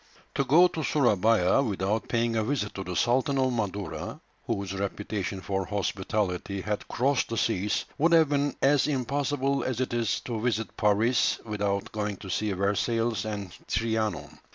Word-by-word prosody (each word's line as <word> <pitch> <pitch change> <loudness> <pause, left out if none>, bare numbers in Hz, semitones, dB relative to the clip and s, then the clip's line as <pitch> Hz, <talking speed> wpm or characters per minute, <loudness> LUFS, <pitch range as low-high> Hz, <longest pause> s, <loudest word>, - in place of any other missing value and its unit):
To 140 - +1
go 160 +7 +6
to 160 -3 -4
Surabaya 115 -6 +3
without 105 0 -1
paying 115 -1 0
a 110 - +1
visit 115 -4 -1
to 95 - -5
the 90 -1 -5
Sultan 130 +5 +2
of 130 -1 +2
Madura, 100 -6 -3 0.3
whose 100 -1 -2
reputation 100 0 -3
for 95 0 -2
hospitality 100 -1 -2
had 105 +1 -3
crossed 135 +2 +1
the 115 - -3
seas, 105 -2 0
would 165 +4 +4
have 160 -3 +6
been 145 0 +1
as 140 +1 +4
impossible 140 0 0
as 130 -2 -2
it 130 -1 -1
is 115 -3 0
to 115 -3 -4
visit 110 -2 -1
Paris 110 +4 +2
without 100 -2 -2
going 105 -2 -3
to 95 -1 -7
see 105 +3 0
Versailles 105 +3 0
and 100 -3 -5 0.2
Trianon. 110 -2 -1
110 Hz, 160 wpm, -27 LUFS, 100-130 Hz, 0.3 s, go